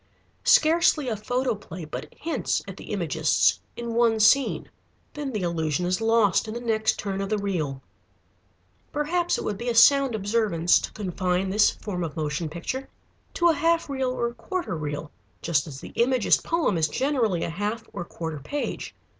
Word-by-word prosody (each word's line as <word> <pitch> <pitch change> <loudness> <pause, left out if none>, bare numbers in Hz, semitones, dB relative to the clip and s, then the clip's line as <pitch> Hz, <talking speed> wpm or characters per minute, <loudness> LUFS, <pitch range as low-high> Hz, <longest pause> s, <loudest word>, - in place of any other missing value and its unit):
Scarcely 315 -3 +4
a 225 - -1
photoplay 215 -6 -3
but 155 - -7
hints 330 +1 -1
at - - -7
the - - -10
Imagists - - +2 0.2
in 235 -1 -4
one 230 -1 +3
scene. 270 +6 +4 0.5
Then 290 -2 -4
the 210 -5 -3
illusion 165 -1 -1
is 180 +4 0
lost 225 -3 +3
in 215 - -5
the - - -3
next 220 -2 +1
turn 195 -1 -3
of 195 - -3
the 215 - +1
reel. 155 -10 -2 1.1
Perhaps 340 +4 0
it - - -4
would 205 -2 -3
be 240 - -2
a 235 - -1
sound 270 +1 +6
observance 205 -5 +2
to - - -6
confine 185 -1 -1
this 210 +1 +5
form 180 -4 -5
of 165 -1 -5
motion 155 +1 -2
picture 170 - -5 0.5
to 345 -1 +4
a - - +5
half 330 -1 +1
reel 265 -2 0
or 235 -2 -2
quarter 340 - -4
reel, 150 -1 -5 0.3
just 155 -2 +1
as 135 -3 -8
the - - -9
Imagist 250 -1 +3
poem 330 - +1
is 155 - +3
generally 230 - 0
a - - -2
half 210 +6 -3
or 195 - -4
quarter 160 -3 -6
page. 285 - -4
215 Hz, 175 wpm, -25 LUFS, 175-255 Hz, 1.1 s, sound